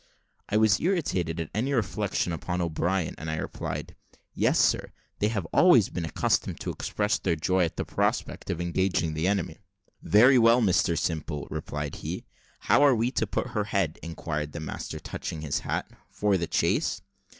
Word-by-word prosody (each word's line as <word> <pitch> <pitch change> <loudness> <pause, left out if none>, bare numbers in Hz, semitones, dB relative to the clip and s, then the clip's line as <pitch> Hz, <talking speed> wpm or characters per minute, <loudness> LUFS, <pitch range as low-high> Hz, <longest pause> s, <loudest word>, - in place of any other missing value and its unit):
I 105 - +2
was 110 -1 +4
irritated 95 - 0
at 80 - -4
any 125 +8 0
reflection 105 -6 -1
upon 90 +2 -3
O'Brien, 85 +1 -1
and 80 - -5
I 80 - -1
replied, 75 - -5 0.4
"Yes - - +2
sir; - - +2 0.3
they 105 - +2
have 105 -4 -1
been 80 - 0
always 125 - +6
accustomed 80 -3 -1
to - - -2
express 105 0 -1
their 85 -3 0
joy 90 +3 +2
at 80 - -6
the - - -2
prospect - - -1
of 85 - -2
engaging 85 -2 0
the 80 +3 -1
enemy." 95 -5 -1 0.4
"Very 125 +5 +6
well, 115 +1 +6
Mr 90 -6 +2
Simple," 75 -3 -2
replied 75 -1 -4
he. - - -5 0.4
"How - - +4
are 140 -3 +6
we 115 +2 0
to 110 - 0
put - - -2
her 105 -1 -1
head?" 95 -7 -1
inquired 75 -3 -4
the - - -5
master, 80 - -5
touching 80 - -6
his 75 -3 -1
hat; - - -3 0.2
"for 105 -1 +1
the 85 -2 -1
chase?" 90 - 0
90 Hz, 175 wpm, -27 LUFS, 80-105 Hz, 0.4 s, always